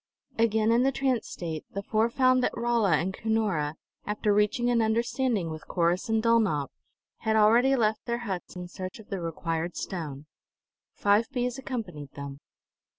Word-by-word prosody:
Again 220 -1 +3
in 235 +1 +4
the 270 +1 +3
trance 260 -3 0
state, 160 -3 -5
the 200 - -2
four 220 +3 +1
found 255 +1 +3
that - - -1
Rolla 230 -5 +2
and 175 +5 +1
Cunora, 200 -10 0 0.3
after 210 0 0
reaching 210 +4 +2
an 235 -1 +3
understanding 225 - 0
with 155 -1 -8
Corrus 175 +5 +1
and 220 0 +2
Dulnop, 215 -12 +2 0.5
had 220 0 0
already 235 +5 +5
left 220 -3 +1
their 235 0 0
huts 190 -4 -5
in 180 0 -6
search 185 +1 -7
of 220 - -14
the 195 -4 -3
required 165 0 -3
stone. 150 -6 -5 0.7
Five 205 +3 +3
bees 250 -1 -2
accompanied 190 - -5
them. 140 -1 -7
215 Hz, 160 wpm, -28 LUFS, 175-235 Hz, 0.7 s, already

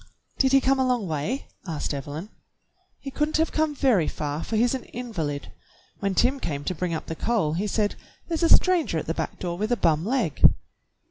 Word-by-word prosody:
"Did 265 -1 +4
he 270 0 +6
come 270 +1 +2
a - - +4
long 250 -6 0
way.?" 160 - -2 0.2
asked 155 -3 -2
Evelyn. 145 +7 -5 0.7
"He 275 - -7
could 300 +2 0
n't - - 0
have 320 0 +1
come 310 -1 0
very 240 - +3
far, 150 +1 -3
for 225 - -3
he's 235 +3 +3
an 260 - -4
invalid. 165 - -4 0.5
When 195 -1 -1
Tim 260 +6 +3
came 145 - -3
to 185 - -2
bring 175 0 -2
up - - -5
the - - -4
coal 195 -4 0
he 190 +6 -1
said, 205 0 0 0.3
'There's 330 -1 -2
a 335 - +3
stranger 350 - +4
at 155 - -2
the 165 - -1
back - - -4
door 175 -1 -4
with 215 +3 -1
a 240 - +3
bum 160 -4 +2
leg.'" 225 - -1
210 Hz, 215 wpm, -25 LUFS, 160-265 Hz, 0.7 s, he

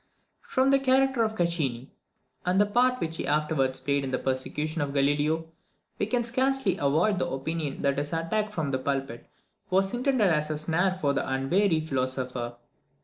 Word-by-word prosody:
From 265 +1 +1
the 275 - +5
character 265 -1 +3
of 220 0 -1
Caccini, 150 - -1 0.5
and 180 +2 +2
the 205 - +5
part 250 +4 +2
which 165 0 -3
he - - -3
afterwards 145 -3 +1
played 140 -1 0
in 135 - -3
the 130 - 0
persecution 150 +5 -2
of 140 -1 -3
Galileo, 145 +3 +1 0.5
we 205 - 0
can 240 +1 +1
scarcely 260 -2 +1
avoid 165 +8 +2
the - - -1
opinion 145 +1 -3
that 140 0 +1
his 145 0 -3
attack 170 +6 -1
from 160 -8 -2
the 130 - 0
pulpit 135 -3 -3 0.4
was 190 +1 +2
intended 245 -5 +2
as 150 -1 +1
a 155 - -2
snare 175 +5 +1
for 145 -6 0
the - - -2
unwary 160 +6 +2
philosopher. 130 -3 -2
160 Hz, 175 wpm, -27 LUFS, 140-205 Hz, 0.5 s, the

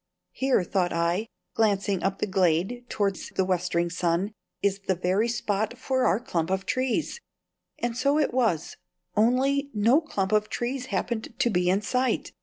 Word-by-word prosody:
"Here," 265 -7 +1
thought 180 0 0
I, 170 +6 0 0.3
glancing 200 -3 +1
up 195 +2 0
the - - 0
glade 190 +5 +1
towards 200 -3 -1
the 190 - 0
westering 175 -2 0
sun, 180 +3 0 0.3
"is 200 -1 +1
the 190 - +2
very 185 +6 +1
spot 220 0 -1
for 260 +1 +1
our 195 - +2
clump 170 -9 -2
of, 190 0 -1
trees;" 260 - -1 0.6
and 240 -1 -2
so 280 +5 +2
it 300 -5 +1
was 225 -11 0 0.4
only 265 +6 +2
no 230 +9 +4
clump 195 - -2
of 215 0 +2
trees 255 +1 -3
happened 220 +3 -3
to 260 -2 +2
be 180 -2 +2
in 195 +3 +2
sight. 255 +4 0
210 Hz, 165 wpm, -26 LUFS, 185-245 Hz, 0.6 s, no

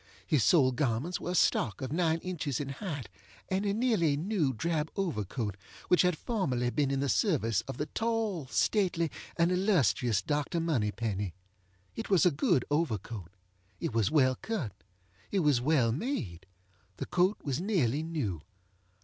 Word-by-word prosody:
His 150 -8 +2
sole 140 -7 +5
garments 130 +6 -1
were - - -4
a 180 - -1
stock 110 - +2
of 130 - -4
nine 165 0 +2
inches 160 -8 -2
in 140 -2 -3
height, 145 - -5 0.4
and 190 +2 0
a - - +2
nearly 200 - +2
new 170 -4 0
drab 155 +5 -1
overcoat 115 - -2 0.3
which 180 - +6
had 180 -3 +2
formerly 130 - -1
been 145 0 +1
in 135 0 0
the 140 - 0
service 125 - +2
of - - -5
the 150 - -1
tall, 220 - -1
stately, 170 - +1 0.3
and 170 +1 +3
illustrious 130 - +2
Dr. 150 - -1
Moneypenny. 105 - -1 0.6
It 225 - -5
was 190 -2 +4
a 180 - +5
good 140 -3 +2
overcoat. 110 - -2 0.5
It - - -3
was 110 -3 +2
well 130 -4 +4
cut. 160 - -3 0.6
It 195 - +1
was 145 -6 +3
well 130 -4 +3
made. 115 - -3 0.5
The - - -3
coat 185 +4 +2
was 140 +1 -2
nearly 155 - +1
new. 140 - -3
150 Hz, 160 wpm, -30 LUFS, 120-180 Hz, 0.6 s, which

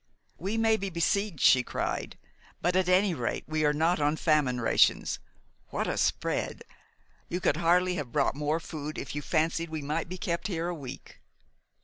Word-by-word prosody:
"We 195 +6 -2
may 225 -1 +3
be 195 -2 -3
besieged," 185 0 0
she 130 - +6
cried; - - -3 0.4
"but 180 +1 0
at 185 -1 +2
any 185 +1 +4
rate 125 -6 -2
we 155 0 0
are 150 - +4
not 160 +4 +1
on 145 +1 +2
famine 150 -6 +2
rations. 115 - +3 0.5
What - - -2
a - - -1
spread! - - -1 0.7
You 180 - -2
could 155 -4 +1
hardly 180 +2 +3
have 135 -6 -4
brought 145 -2 +2
more 150 +3 -1
food 155 -2 -6
if - - -5
you 145 - -3
fancied 165 +1 0
we 155 -2 -4
might 155 +4 -2
be 185 - -5
kept 170 +1 -2
here 170 -4 -2
a - - -2
week." 140 -6 -9
165 Hz, 185 wpm, -29 LUFS, 150-180 Hz, 0.7 s, she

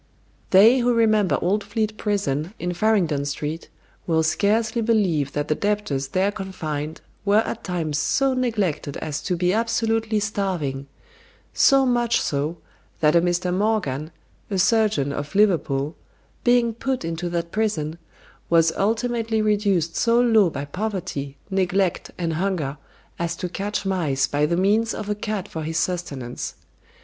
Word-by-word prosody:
They 220 +7 +7
who 245 0 +2
remember 215 -4 +3
old 200 +4 +1
Fleet 215 0 -2
Prison, 195 -5 -2
in 180 0 -3
Farringdon 175 -7 +1
Street, 150 +3 -4 0.4
will 160 -2 +2
scarcely 220 +8 +1
believe 190 - +1
that 145 0 -2
the - - +2
debtors 200 -8 -1
there 190 +8 +1
confined 160 -7 -5 0.2
were 205 +2 +4
at - - -5
times 160 -5 -2
so 270 - +2
neglected 205 - -1
as 150 -2 -4
to 180 - -1
be 180 +1 +1
absolutely 225 -1 +1
starving; 180 -10 -2 0.7
so 270 -1 +5
much 240 -2 +2
so, 150 +4 -2 0.4
that 150 0 +3
a 170 - +6
Mr. 175 +1 0
Morgan, 180 -8 0 0.4
a 195 - -1
surgeon 205 -8 +2
of 145 +7 -5
Liverpool, 160 -8 +2 0.5
being 240 -1 +3
put 255 -3 -2
into 165 +1 -3
that 170 -1 -3
prison, 170 -8 -1 0.5
was 165 -1 +4
ultimately 225 +1 0
reduced 205 -6 +1
so 235 0 +3
low 225 -6 +5
by 140 -2 -5
poverty, 155 -6 -4
neglect, 190 -1 0
and 170 -2 -1
hunger, 160 -5 -1 0.4
as 170 0 -1
to 180 - -4
catch 200 +3 -3
mice 155 -9 +1
by 145 +2 +1
the 170 - 0
means 215 +5 +2
of 210 - -5
a - - +3
cat 210 -1 -4
for 160 - -6
his 160 +1 -3
sustenance. 150 -9 -3
185 Hz, 145 wpm, -23 LUFS, 160-215 Hz, 0.7 s, They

